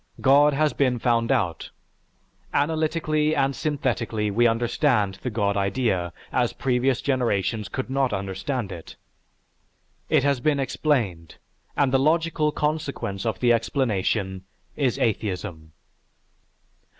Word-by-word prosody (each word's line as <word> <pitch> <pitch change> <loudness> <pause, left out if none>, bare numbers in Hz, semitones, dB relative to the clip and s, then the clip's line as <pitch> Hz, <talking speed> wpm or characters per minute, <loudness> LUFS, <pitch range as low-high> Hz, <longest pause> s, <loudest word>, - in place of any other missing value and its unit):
God 145 +2 +5
has 155 +1 +2
been 130 -3 +1
found 115 0 +1
out; 90 -11 -1 0.9
analytically 155 0 +1
and 135 -1 +1
synthetically 120 -7 -1
we 120 +4 +4
understand 115 -3 +1
the 125 - -2
God 105 -3 0
idea 100 -3 0 0.2
as 125 -2 +1
previous 130 0 0
generations 115 -5 0
could 130 - -4
not 135 -1 0
understand 100 +4 -3
it. 85 -3 -9 1.1
It - - +3
has 140 -2 +2
been 145 +2 +1
explained, 115 - -1 0.4
and 140 -2 +3
the 135 - +4
logical 155 +1 +2
consequence 150 -10 -2
of 110 - -2
the 120 -1 +5
explanation 100 -6 -1 0.3
is 130 -5 0
Atheism." 95 -7 -2
125 Hz, 115 wpm, -24 LUFS, 100-140 Hz, 1.1 s, God